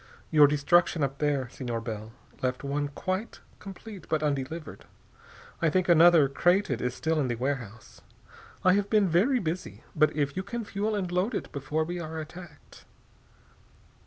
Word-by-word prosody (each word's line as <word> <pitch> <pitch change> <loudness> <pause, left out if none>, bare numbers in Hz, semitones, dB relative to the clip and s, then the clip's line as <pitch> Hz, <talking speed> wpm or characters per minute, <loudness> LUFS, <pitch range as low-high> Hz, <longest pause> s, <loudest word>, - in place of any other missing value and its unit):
Your 150 -2 +7
destruction 150 +2 +2
up 140 0 -2
there, 145 -4 0
Senor 120 -3 -4
Bell, 110 -1 -6 0.3
left 130 +1 -2
one 145 +1 -1
quite 185 +9 -4 0.2
complete 195 -1 -10
but 155 -1 0
undelivered. 145 +2 -3 0.8
I 165 - +3
think 185 +3 +1
another, 170 -3 +7
crated, 175 - +1
is 125 0 -2
still 160 0 0
in 140 - +1
the 120 - -1
warehouse. 120 -4 -5 0.6
I 185 - +5
have 200 +1 +1
been 210 -3 +4
very 195 - +3
busy, 160 - -4
but 155 -1 +4
if 145 -1 0
you 185 - -1
can 230 +4 -5
fuel 205 +2 -2
and 185 -4 -2
load 185 +6 0
it - - -4
before 145 +3 -2
we 175 +2 -4
are 160 -1 -6
attacked...." 170 +3 -11
155 Hz, 160 wpm, -28 LUFS, 140-185 Hz, 0.8 s, Your